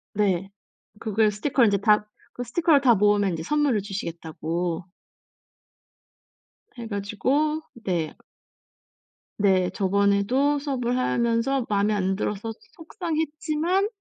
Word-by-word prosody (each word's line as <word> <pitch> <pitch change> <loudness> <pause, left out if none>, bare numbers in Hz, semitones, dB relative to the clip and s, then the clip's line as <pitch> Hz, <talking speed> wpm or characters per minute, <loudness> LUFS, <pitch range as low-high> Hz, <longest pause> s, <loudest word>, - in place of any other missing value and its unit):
네. 195 -2 +1 0.5
그걸 215 -1 +2
스티커를 235 +2 +2
인제 200 -1 +2
다 210 +1 +3 0.3
그 245 - -5
스티커를 315 +3 +3
다 245 -4 +5
모으면 205 -1 +3
인제 160 -1 -4
선물을 290 - +1
주시겠다고 170 -3 -4 1.9
해 230 -1 -6
가지고 255 +10 0 0.2
네. 170 -4 -2 1.3
네. 185 -3 +3
저번에도 200 +9 +2
수업을 250 -4 -1
하면서 240 +1 +1
마음에 205 +1 +2
안 190 -1 0
들어서 210 +2 -3
소 220 - -13
속상했지만 320 +2 -1
215 Hz, 250 characters per minute, -25 LUFS, 200-275 Hz, 1.9 s, 다